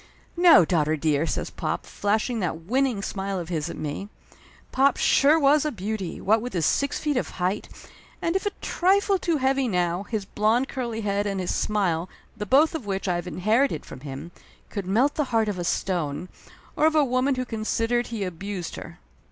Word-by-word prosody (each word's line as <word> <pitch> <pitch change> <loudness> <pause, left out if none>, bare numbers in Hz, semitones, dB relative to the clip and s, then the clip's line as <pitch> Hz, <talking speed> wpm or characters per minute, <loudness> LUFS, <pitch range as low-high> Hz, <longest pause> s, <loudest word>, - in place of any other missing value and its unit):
"No, 340 - +7
daughter 155 -2 +1
dear!" 150 +1 +1
says - - -3
pop, - - -3
flashing 215 +3 -1
that 165 -4 -2
win 255 +11 +1
ning 235 -7 -2
smile 195 -1 -3
of 175 -2 -5
his 160 -4 -2
at - - -7
me. 155 +7 -5 0.6
Pop 270 +1 +3
sure 300 +4 +4
was 290 0 +4
a 305 - -1
beauty, 205 -4 -4
what 215 +3 +2
with 245 +2 -5
his 170 -4 0
six 280 0 +1
feet 295 -3 -1
of - - -1
height, 185 +3 -1 0.5
and 335 +2 -1
if 385 +1 0
a - - 0
trifle 390 +2 +2
too 335 -3 0
heavy 265 -1 +1
now, 180 -3 0
his 205 -1 -4
blond 225 +7 +1
curly 235 -5 -4
head 205 0 0
and 195 -1 -2
his 180 - -1
smile, 185 -5 0 0.3
the 210 -2 -5
both 290 +8 +4
of 290 -10 -5
which 195 0 -2
I 180 - +2
have 175 0 -3
inherited 215 - +1
from - - -10
him, 140 +4 -8 0.4
could 200 -4 -4
melt 245 +9 +3
the 300 - 0
heart 225 -3 +1
of 200 -3 -2
a - - -2
stone, 175 -2 -2 0.5
or 310 - +4
of 315 - +1
a 300 -2 +5
woman 255 +2 +1
who 255 0 -2
considered 230 +1 -1
he 225 -3 -4
abused 185 0 -5
her. - - -9
210 Hz, 200 wpm, -25 LUFS, 180-265 Hz, 0.6 s, No